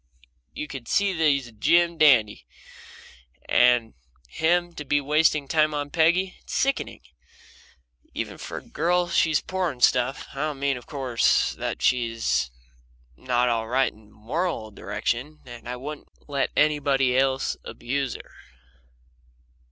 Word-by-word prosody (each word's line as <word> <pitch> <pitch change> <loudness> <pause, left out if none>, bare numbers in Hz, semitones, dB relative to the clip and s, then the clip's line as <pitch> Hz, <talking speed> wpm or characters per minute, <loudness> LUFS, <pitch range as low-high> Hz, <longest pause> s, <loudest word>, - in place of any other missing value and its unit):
You 150 - -5
can 130 -5 -8
see 200 -1 +2
he's 150 -5 +2
a 120 - -12
Jim 170 +10 +2
dandy 120 -9 +4 1.0
and 120 -2 +3 0.4
him 175 - +1
to 150 - -7
be 145 +1 +1
wasting 150 0 +2
time 155 0 +2
on 145 0 -3
Peggy 175 +4 +2
it's - - -7
sickening! 275 0 -1 1.1
Even - - -5
for - - -6
a - - -7
girl 175 +3 0
she's 160 -2 +2
poor 180 -8 -3
stuff. 125 +2 +2
I - - -13
don't 150 -2 -2
mean, 140 0 +1
of 125 - -10
course, 130 -5 +1
that - - -5
she's 115 - +1 0.7
not 125 - 0
all 115 -2 0
right 130 +3 +1
in 110 0 -20
a - - -23
moral 120 +1 -3
direction, 120 +9 -4
and 120 -1 -10
I 125 - -3
wouldn't 145 +4 -8 0.2
let 140 -2 -1
anybody 140 -4 +2
else 135 0 +1
abuse 135 +1 -3
her. - - -12
140 Hz, 140 wpm, -25 LUFS, 120-155 Hz, 1.1 s, dandy